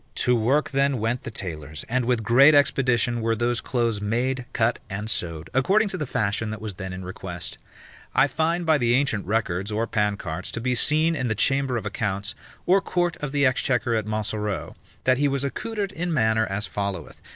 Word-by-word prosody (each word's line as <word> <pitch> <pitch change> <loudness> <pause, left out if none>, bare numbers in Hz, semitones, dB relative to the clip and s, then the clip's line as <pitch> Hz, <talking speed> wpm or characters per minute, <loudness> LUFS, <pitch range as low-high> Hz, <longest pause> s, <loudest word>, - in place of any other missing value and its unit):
To 125 - +2
work 130 +7 +1
then 140 -1 +2
went 115 +3 -1
the - - -6
tailors, 80 -8 -4
and 125 +1 0
with 120 -2 +1
great 135 +7 +6
expedition 125 -4 +2
were 115 0 +1
those 120 +1 0
clothes 115 -4 -1
made, 120 +4 -1
cut, 115 -1 +1
and 105 +2 -4
sewed, 85 -7 -2
according 200 - +3
to 185 - -2
the 150 -5 -3
fashion 110 0 -1
that 110 0 -5
was 110 -2 -4
then 95 0 -6
in 90 0 -7
request. 90 -1 -6 0.6
I - - +6
find 165 +5 0
by 160 -2 +4
the 120 -1 +3
ancient 125 -8 0
records 100 -2 -1
or 110 +2 0
pancarts, 100 -6 -2
to - - -2
be 125 +2 0
seen 155 +6 +3
in 130 -4 -1
the 110 - 0
chamber 135 +3 +1
of 110 - -5
accounts, 105 -1 -2 0.3
or 195 +2 +4
court 175 -3 0
of 145 -2 -4
the 140 -1 +2
exchequer 125 -2 +1
at 110 -2 -1
Montsoreau, 105 -2 -3 0.3
that 130 0 +3
he 145 - +3
was 140 -1 0
accoutred 200 +8 -3
in 175 -1 -3
manner 110 -6 +2
as 100 +2 -2
followeth. 100 -1 -4
120 Hz, 195 wpm, -24 LUFS, 105-140 Hz, 0.6 s, great